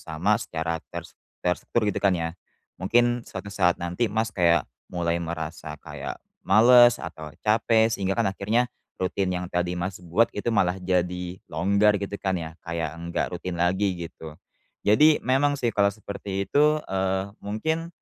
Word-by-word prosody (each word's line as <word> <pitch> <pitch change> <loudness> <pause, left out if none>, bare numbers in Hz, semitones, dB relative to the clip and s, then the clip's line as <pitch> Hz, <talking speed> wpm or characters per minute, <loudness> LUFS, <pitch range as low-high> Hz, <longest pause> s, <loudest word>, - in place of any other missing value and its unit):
sama 90 +8 0
secara 80 -3 -3
ter - - -6 0.4
terstruktur 90 +5 0
gitu - - -3
kan 95 -2 +3
ya. 80 -1 -2 0.5
Mungkin, 120 +4 +2
suatu 100 - -7
saat 90 -3 +3
nanti 90 +7 -1
Mas 110 +2 -1
kayak 85 -3 +3 0.2
mulai 85 -1 -1
merasa 80 -1 -5
kayak - - -7 0.3
males 120 +3 +7
atau 80 -2 -8
capek, 110 +1 +3
sehingga 95 -2 -1
kan 115 - +2
akhirnya 110 +6 +1 0.3
rutin 95 +1 0
yang 90 0 -3
tadi 90 0 0
Mas 95 +1 -3
buat 90 +7 +2
itu 105 - -3
malah 95 -4 +2
jadi 90 0 -1
longgar 100 +5 +3
gitu 100 0 -5
kan 95 -1 0
ya, 80 -2 -5
kayak 85 -2 -3
enggak 85 0 -2
rutin 90 0 -4
lagi 95 +2 +1
gitu. 80 -1 -11 0.5
Jadi, 150 +9 +6
memang 145 +3 +2
sih 120 - +1
kalau 100 -1 +3
seperti 100 -1 -5
itu, 150 +1 +4
eee, 95 0 0 0.2
mungkin, 160 +11 -2
95 Hz, 155 wpm, -25 LUFS, 85-110 Hz, 0.5 s, males